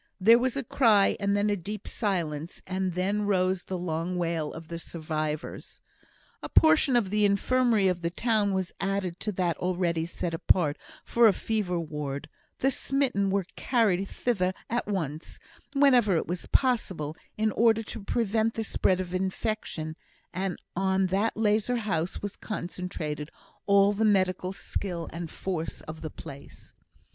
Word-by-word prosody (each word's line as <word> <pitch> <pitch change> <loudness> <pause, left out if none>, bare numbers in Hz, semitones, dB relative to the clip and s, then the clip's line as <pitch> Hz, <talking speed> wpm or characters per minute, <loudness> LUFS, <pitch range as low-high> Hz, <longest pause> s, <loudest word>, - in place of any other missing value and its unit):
There 225 +5 +7
was 255 +1 0
a 275 - 0
cry, 225 -5 +4
and 200 0 +1
then 205 +1 +2
a - - +2
deep 205 +3 -6
silence, 170 -6 -2
and 185 -1 -2
then 200 +3 0
rose 185 -2 +1
the 185 - -3
long 175 +1 -2
wail 165 -3 -1
of 165 0 -9
the 170 0 -5
survivors. 155 -2 -4 0.6
A - - -6
portion 315 -4 +5
of 215 -6 +2
the 210 0 +2
Infirmary 215 +1 +3
of 180 -1 0
the 170 - 0
town 215 +2 +1
was 190 -1 -1
added 195 -3 -1
to 215 - -2
that 175 -2 0
already 175 -2 0
set 170 -1 -3
apart 165 -2 +2 0.3
for 235 -1 +5
a 210 - +5
fever 200 -6 -1
ward; 150 -3 -4 0.3
the 270 - +2
smitten 260 -8 +1
were 195 -1 +1
carried 205 -7 +1
thither 190 -7 0 0.2
at 240 -2 0
once, 160 -6 -3 0.4
whenever 250 -8 +5
it - - -1
was 175 +1 -4
possible, 185 - +1 0.2
in 215 0 +2
order 225 0 +3
to 215 0 -8
prevent 225 +1 0
the 225 - -1
spread 185 -3 +1
of 180 -1 -4
infection; 185 -4 -2 0.4
and 185 0 -2 0.2
on 190 +1 +2
that 195 +5 0
lazar 220 +3 +2
house 185 -7 -2
was 205 -1 -4
concentrated 175 -6 -5 0.4
all 200 0 +5
the 210 +2 0
medical 185 -3 +2
skill 180 -3 -4
and 165 0 -5
force 165 -3 -4
of 155 0 -9
the 155 - -4
place. 140 -1 -11
190 Hz, 160 wpm, -28 LUFS, 170-215 Hz, 0.6 s, There